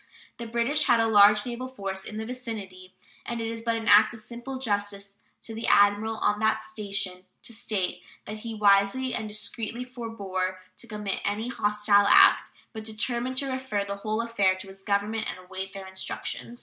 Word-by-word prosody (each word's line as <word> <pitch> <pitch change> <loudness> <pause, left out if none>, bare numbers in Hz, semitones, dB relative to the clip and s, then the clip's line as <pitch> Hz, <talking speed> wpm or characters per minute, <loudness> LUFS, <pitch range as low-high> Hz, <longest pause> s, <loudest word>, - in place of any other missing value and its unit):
The 235 - -6
British 235 +6 +1
had 240 -2 +4
a 225 - +4
large 210 -1 +6
naval 250 +1 -4
force 195 -6 -5
in 215 - -7
the 220 - -3
vicinity, 210 -7 -7 0.3
and 235 -1 -4
it 225 - -2
is 225 0 -4
but 230 0 0
an 225 0 -4
act 210 +3 +6
of - - -10
simple 240 +4 -7
justice 205 -4 -3 0.3
to 225 - -6
the 225 +1 -4
admiral 205 +2 +4
on 210 -1 +1
that 220 0 +1
station 200 -4 -4 0.2
to 235 - -3
state 210 -4 -2 0.2
that 215 +1 -6
he 225 0 -6
wisely 205 +5 +3
and 220 -2 -3
discreetly 220 +3 -5
forbore 200 -7 -4 0.2
to 235 - -8
commit 210 -3 -3
any 210 +4 -1
hostile 210 -3 +3
act, - - +7 0.3
but 220 -1 -6
determined 235 +3 -2
to 275 0 0
refer 260 -6 -2
the 200 0 -4
whole 215 +3 -1
affair 200 -5 +2
to 185 +1 -9
his 195 0 -13
Government 210 +2 0
and - - -5
await 190 +1 -7
their 195 -1 -7
instructions. 190 +5 -5
215 Hz, 190 wpm, -27 LUFS, 200-230 Hz, 0.3 s, act